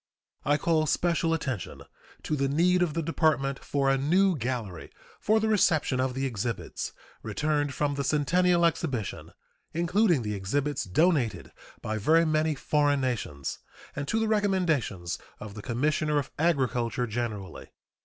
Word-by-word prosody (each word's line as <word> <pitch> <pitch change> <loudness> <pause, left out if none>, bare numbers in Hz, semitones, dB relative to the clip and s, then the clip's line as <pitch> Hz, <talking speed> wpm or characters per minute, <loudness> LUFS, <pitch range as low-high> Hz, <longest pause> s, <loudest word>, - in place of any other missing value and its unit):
I 145 0 +2
call 155 -1 +1
special 170 +1 +1
attention 135 - -3 0.4
to 155 - -1
the 140 -1 0
need 175 +6 +3
of 165 -4 0
the 165 - -1
Department 150 -4 +1
for 140 -1 0
a 135 - +1
new 180 +6 +3
gallery 120 - -4 0.3
for 220 +1 +2
the 220 - 0
reception 160 -10 +2
of 130 -1 0
the 135 +1 -1
exhibits 115 -2 -4 0.3
returned 145 -2 -1
from 145 -1 0
the 140 0 -2
Centennial 170 +5 +3
Exhibition, 130 - -2 0.4
including 175 - +2
the 105 -1 -2
exhibits 140 +10 -1
donated 135 - +1 0.3
by 110 0 -2
very 160 +10 +4
many 155 0 +1
foreign 145 0 +1
nations, 105 - -3 0.4
and 140 0 -4
to 225 - +1
the 225 - +1
recommendations 175 - 0 0.2
of 105 - -8
the 105 - -8
Commissioner 150 +6 0
of 140 -2 -2
Agriculture 125 -7 +1
generally. 110 -5 -5
145 Hz, 145 wpm, -28 LUFS, 125-165 Hz, 0.4 s, very